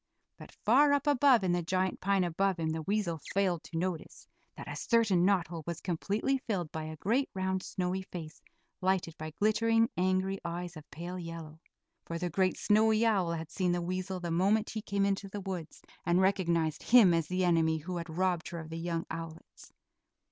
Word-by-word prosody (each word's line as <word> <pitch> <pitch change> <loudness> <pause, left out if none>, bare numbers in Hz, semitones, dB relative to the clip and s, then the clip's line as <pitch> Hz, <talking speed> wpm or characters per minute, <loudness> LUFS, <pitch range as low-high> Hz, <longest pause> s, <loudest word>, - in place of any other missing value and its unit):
But - - -12
far 285 +6 +5
up 285 -1 +1
above 275 -5 +5
in 185 - +1
the 175 0 +1
giant 185 +2 -1
pine 195 -1 +2
above 185 +2 0
him 160 -1 -1
the 160 0 -3
weasel 185 -2 -1 0.2
failed 185 -4 +1
to 165 - -6
notice 175 -1 -4 0.3
that - - -8
a - - -5
certain 220 -7 +2
knot 195 -3 +3
hole 170 -2 -5
was 170 -1 -3
completely 205 +9 -1
filled 190 -10 -3
by 160 -1 -4
a 155 0 -6
great, 240 - +1
round, 190 0 -1
snowy 185 0 -2
face 160 -5 -9 0.4
lighted 185 -3 0
by 155 0 -5
glittering, 225 - +2
angry 185 +1 0
eyes, 175 +1 -5
of 155 -1 -12
pale 175 +3 -6
yellow. 165 -2 -8 0.5
For 170 - -3
the 175 0 -3
great 185 +2 +1
snowy 220 +1 +3
owl 190 -7 +2
had 160 -1 -5
seen 180 -2 0
the 175 - 0
weasel 185 +1 -3
the 175 -1 -4
moment 200 +6 +2
he 220 - -4
came 200 -1 0
into 195 0 -1
the 205 +1 -6
woods, 180 -5 -6 0.2
and 175 +1 +2
recognized 170 -5 +1
him 225 -7 +6
as 165 -2 +1
the 185 +1 0
enemy 165 -2 +3
who 175 +3 -5
had 170 0 -5
robbed 175 0 0
her 170 - -6
of 160 0 -9
the 165 - -4
young 165 0 -2
owlets. 165 0 -9
180 Hz, 200 wpm, -31 LUFS, 165-200 Hz, 0.5 s, him